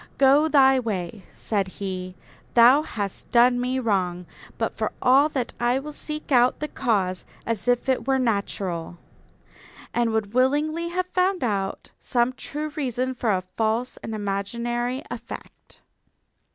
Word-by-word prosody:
'Go 280 Hz, +3 st, +5 dB
thy 270 Hz, -3 st, +5 dB
way,' 205 Hz, -4 st, -4 dB
said 200 Hz, -3 st, -2 dB
he, 185 Hz, -2 st, -5 dB, 0.4 s
'thou 245 Hz, +5 st, +7 dB
hast 205 Hz, -10 st, -5 dB
done 245 Hz, +1 st, +4 dB
me 255 Hz, +1 st, -1 dB
wrong; 185 Hz, -7 st, 0 dB, 0.3 s
but -, -, -2 dB
for -, -, -2 dB
all 270 Hz, +4 st, +5 dB
that 260 Hz, -5 st, -3 dB
I 240 Hz, +1 st, +2 dB
will 295 Hz, +2 st, -6 dB
seek 300 Hz, 0 st, -5 dB
out 245 Hz, -1 st, +4 dB
the 300 Hz, -, -2 dB
cause, 200 Hz, -, -1 dB, 0.2 s
as 230 Hz, -1 st, -2 dB
if 245 Hz, +1 st, +2 dB
it 260 Hz, -2 st, 0 dB
were 270 Hz, 0 st, +3 dB
natural'; 200 Hz, -8 st, -2 dB, 1.0 s
and 240 Hz, -1 st, +2 dB
would 220 Hz, -2 st, -1 dB
willingly 295 Hz, +6 st, +1 dB
have 365 Hz, +1 st, -1 dB
found 365 Hz, -1 st, +1 dB
out 195 Hz, -4 st, -2 dB
some 245 Hz, 0 st, +1 dB
true 300 Hz, +4 st, -5 dB
reason 260 Hz, -3 st, -2 dB
for 235 Hz, -3 st, 0 dB
a 185 Hz, -2 st, 0 dB
false 220 Hz, +6 st, -2 dB
and 220 Hz, -, -6 dB
imaginary 235 Hz, +6 st, -2 dB
effect." -, -, -10 dB
240 Hz, 145 wpm, -24 LUFS, 205-270 Hz, 1.0 s, thou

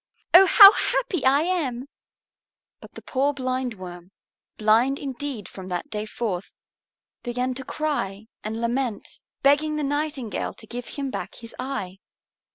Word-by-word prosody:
Oh, 375 Hz, +2 st, +9 dB
how 400 Hz, -1 st, +11 dB
happy 370 Hz, -, -1 dB
I 275 Hz, +2 st, +4 dB
am!" 290 Hz, -9 st, -1 dB, 0.9 s
But -, -, -15 dB
the -, -, -10 dB
poor 280 Hz, +2 st, 0 dB
Blindworm, 230 Hz, -10 st, -4 dB, 0.5 s
blind 225 Hz, +6 st, +3 dB
indeed 270 Hz, -6 st, -5 dB
from 190 Hz, -1 st, -9 dB
that 180 Hz, -2 st, -4 dB
day 215 Hz, 0 st, -3 dB
forth, 200 Hz, -6 st, -4 dB, 0.7 s
began 250 Hz, +1 st, -2 dB
to 265 Hz, +1 st, -6 dB
cry 225 Hz, -10 st, -3 dB, 0.2 s
and 220 Hz, +1 st, -4 dB
lament, 235 Hz, -1 st, -3 dB, 0.2 s
begging 300 Hz, +2 st, +3 dB
the 300 Hz, -, -2 dB
Nightingale 290 Hz, -5 st, -3 dB
to -, -, -13 dB
give 240 Hz, +2 st, -6 dB
him 275 Hz, -2 st, -4 dB
back -, -, -5 dB
his 230 Hz, -1 st, -10 dB
eye. 225 Hz, -8 st, -5 dB
255 Hz, 140 wpm, -24 LUFS, 215-285 Hz, 0.9 s, how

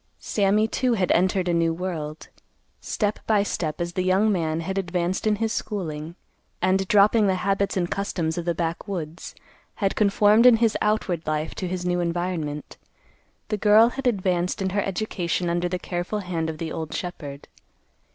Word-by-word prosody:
Sammy, 210 Hz, +1 st, +1 dB
too, 250 Hz, +1 st, 0 dB
had 190 Hz, -4 st, +1 dB
entered 185 Hz, +1 st, +2 dB
a 175 Hz, -, +1 dB
new 165 Hz, -1 st, +2 dB
world. 160 Hz, -4 st, -5 dB, 0.5 s
Step 210 Hz, -1 st, -2 dB
by 210 Hz, -2 st, +3 dB
step, 155 Hz, -6 st, -3 dB
as 175 Hz, 0 st, -3 dB
the 185 Hz, -, -1 dB
young 190 Hz, +4 st, +3 dB
man 165 Hz, -4 st, 0 dB
had 190 Hz, +4 st, -2 dB
advanced 180 Hz, +2 st, -1 dB
in 215 Hz, -, +3 dB
his 225 Hz, +1 st, -1 dB
schooling, 165 Hz, -5 st, -4 dB, 0.4 s
and, 190 Hz, +1 st, +1 dB
dropping 210 Hz, +2 st, +5 dB
the 190 Hz, -, +2 dB
habits 195 Hz, +2 st, 0 dB
and 175 Hz, -2 st, +1 dB
customs 175 Hz, -5 st, -2 dB
of 175 Hz, -, -4 dB
the 170 Hz, -1 st, 0 dB
backwoods, 170 Hz, 0 st, -4 dB, 0.4 s
had 195 Hz, -3 st, 0 dB
conformed 210 Hz, +3 st, +5 dB
in 245 Hz, -, +8 dB
his 225 Hz, -1 st, +2 dB
outward 195 Hz, -6 st, 0 dB
life 155 Hz, +1 st, -1 dB
to 185 Hz, -, -4 dB
his 180 Hz, 0 st, -4 dB
new 180 Hz, 0 st, +1 dB
environment, 170 Hz, -4 st, -3 dB, 0.7 s
the 210 Hz, -, 0 dB
girl 215 Hz, +3 st, +6 dB
had 270 Hz, +1 st, -3 dB
advanced 185 Hz, -5 st, 0 dB
in 190 Hz, -1 st, -1 dB
her 205 Hz, +1 st, +1 dB
education 180 Hz, -3 st, -2 dB
under 175 Hz, +1 st, 0 dB
the 180 Hz, -, -1 dB
careful 180 Hz, +3 st, -3 dB
hand 170 Hz, -4 st, -2 dB
of 160 Hz, -, -5 dB
the 160 Hz, 0 st, -4 dB
old 160 Hz, -2 st, -5 dB
shepherd. 145 Hz, -6 st, -6 dB
185 Hz, 175 wpm, -24 LUFS, 170-205 Hz, 0.7 s, in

